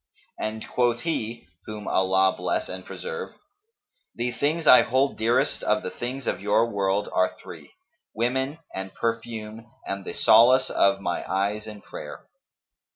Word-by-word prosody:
And 110 Hz, 0 st, -4 dB
quoth 120 Hz, -1 st, +1 dB
he 120 Hz, -, -3 dB, 0.2 s
(whom 105 Hz, -1 st, -7 dB
Allah 95 Hz, 0 st, +3 dB
bless -, -, -2 dB
and 95 Hz, 0 st, -5 dB
preserve!), 475 Hz, -, -6 dB, 0.8 s
'The 120 Hz, +1 st, -1 dB
things 155 Hz, +5 st, -1 dB
I 125 Hz, -, +9 dB
hold 130 Hz, +3 st, +1 dB
dearest 115 Hz, +2 st, +1 dB
of -, -, +1 dB
the 90 Hz, -, -4 dB
things 125 Hz, +2 st, -5 dB
of -, -, -2 dB
your 105 Hz, +3 st, +3 dB
world 100 Hz, -1 st, 0 dB
are 95 Hz, -, +1 dB
three: -, -, -12 dB, 0.4 s
women 130 Hz, +6 st, -1 dB, 0.2 s
and 95 Hz, 0 st, -6 dB
perfume 115 Hz, -1 st, -4 dB
and 100 Hz, 0 st, -4 dB
the 85 Hz, -, -6 dB
solace 125 Hz, +4 st, +5 dB
of 100 Hz, 0 st, +3 dB
my 90 Hz, -2 st, -2 dB
eyes 100 Hz, +3 st, -1 dB
in 105 Hz, -1 st, -9 dB
prayer.' -, -, -9 dB
110 Hz, 150 wpm, -25 LUFS, 100-125 Hz, 0.8 s, I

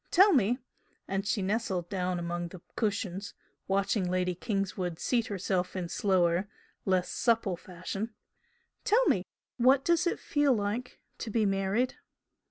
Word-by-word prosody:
Tell 385 Hz, +3 st, +6 dB
me" 245 Hz, -3 st, +3 dB, 0.5 s
and 195 Hz, +1 st, -2 dB
she 200 Hz, -1 st, +1 dB
nestled 190 Hz, -4 st, -1 dB
down 180 Hz, -1 st, -1 dB
among 175 Hz, 0 st, -3 dB
the 170 Hz, 0 st, -11 dB
cushions, 200 Hz, -2 st, -2 dB, 0.3 s
watching 195 Hz, -1 st, +1 dB
Lady 180 Hz, 0 st, +1 dB
Kingswood 185 Hz, -3 st, -2 dB
seat 235 Hz, +4 st, +1 dB
herself 185 Hz, -2 st, -1 dB
in 180 Hz, -2 st, -3 dB
slower, 185 Hz, 0 st, +2 dB, 0.4 s
less 185 Hz, -2 st, +2 dB
supple 230 Hz, -6 st, +1 dB
fashion 190 Hz, +5 st, -6 dB, 0.7 s
"tell 475 Hz, +4 st, +4 dB
me -, -, +3 dB, 0.3 s
what 260 Hz, +2 st, +5 dB
does 345 Hz, +1 st, +3 dB
it -, -, 0 dB
feel 290 Hz, -3 st, +2 dB
like 210 Hz, +4 st, -2 dB, 0.2 s
to 230 Hz, -, -4 dB
be 220 Hz, 0 st, +2 dB
married?" 195 Hz, +5 st, +1 dB
195 Hz, 140 wpm, -30 LUFS, 185-230 Hz, 0.7 s, Tell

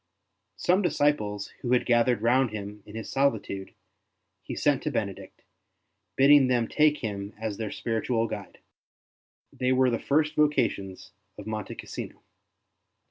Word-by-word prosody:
Some 185 Hz, +3 st, +2 dB
disciples 145 Hz, -, 0 dB
who 125 Hz, 0 st, 0 dB
had 125 Hz, -, +3 dB
gathered 120 Hz, -2 st, +2 dB
round 125 Hz, +2 st, +3 dB
him 105 Hz, 0 st, -7 dB
in 105 Hz, -, -11 dB
his 115 Hz, -, -6 dB
sohtude 110 Hz, -8 st, -1 dB, 0.7 s
he -, -, -6 dB
sent -, -, +2 dB
to -, -, -2 dB
Benedict, -, -, -5 dB, 0.7 s
bidding 140 Hz, 0 st, +6 dB
them 120 Hz, -3 st, +1 dB
take 150 Hz, -1 st, +3 dB
him 100 Hz, -2 st, -5 dB
as 110 Hz, -2 st, -3 dB
their 110 Hz, -2 st, -3 dB
spiritual 115 Hz, +1 st, -1 dB
guide; -, -, -7 dB, 1.0 s
they 125 Hz, 0 st, 0 dB
were 130 Hz, -1 st, +3 dB
the 115 Hz, -, -1 dB
first 150 Hz, +2 st, +1 dB
vocations 100 Hz, -12 st, 0 dB, 0.3 s
of 105 Hz, -, -9 dB
Monte 110 Hz, -2 st, -5 dB
Cassino. -, -, -8 dB
120 Hz, 135 wpm, -27 LUFS, 105-135 Hz, 1.0 s, bidding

